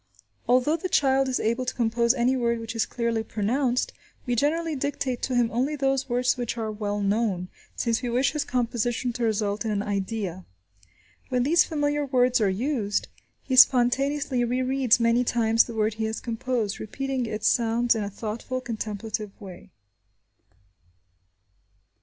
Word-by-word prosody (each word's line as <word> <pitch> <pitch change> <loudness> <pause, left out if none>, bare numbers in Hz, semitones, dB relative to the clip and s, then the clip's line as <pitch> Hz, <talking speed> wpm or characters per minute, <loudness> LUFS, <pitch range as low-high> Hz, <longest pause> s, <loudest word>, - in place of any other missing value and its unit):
Although 255 +6 +3
the 370 +3 -4
child 270 -3 +3
is 260 - 0
able 235 +3 0
to 255 - -3
compose 235 0 +2
any 250 +1 +2
word 235 -2 0
which 225 +1 -6
is 225 - 0
clearly 235 -2 -1
pronounced, 245 +4 -1 0.3
we 245 - 0
generally 315 +5 0
dictate 265 -2 -2
to 255 - -1
him 240 -2 +2
only 260 +6 0
those 270 -1 0
words 250 +2 +1
which 240 -1 -3
are 220 -1 -2
well 205 -1 -3
known, 200 -3 0 0.3
since 230 -1 0
we 245 - -3
wish 245 +1 +2
his 300 - -1
composition 240 0 -1
to 240 0 -3
result 210 -2 0
in 225 - -2
an 205 -1 -1
idea. 200 -2 -3 0.9
When 250 -2 +1
these 325 +6 +4
familiar 295 -2 0
words 250 -3 +2
are 205 - +3
used, 210 0 -1 0.3
he 260 - -1
spontaneously 265 +2 +4
rereads 255 0 +2
many 230 +1 +3
times 230 -2 +3
the 235 - -8
word 215 0 +1
he 220 +1 -3
has 220 0 -3
composed, 230 -3 -2
repeating 265 +2 -3
its 215 0 -1
sounds 235 +1 +2
in 220 -2 -2
a 200 - -3
thoughtful, 225 +5 -4
contemplative 215 -3 -5
way. 190 -1 -11
240 Hz, 160 wpm, -25 LUFS, 220-255 Hz, 0.9 s, these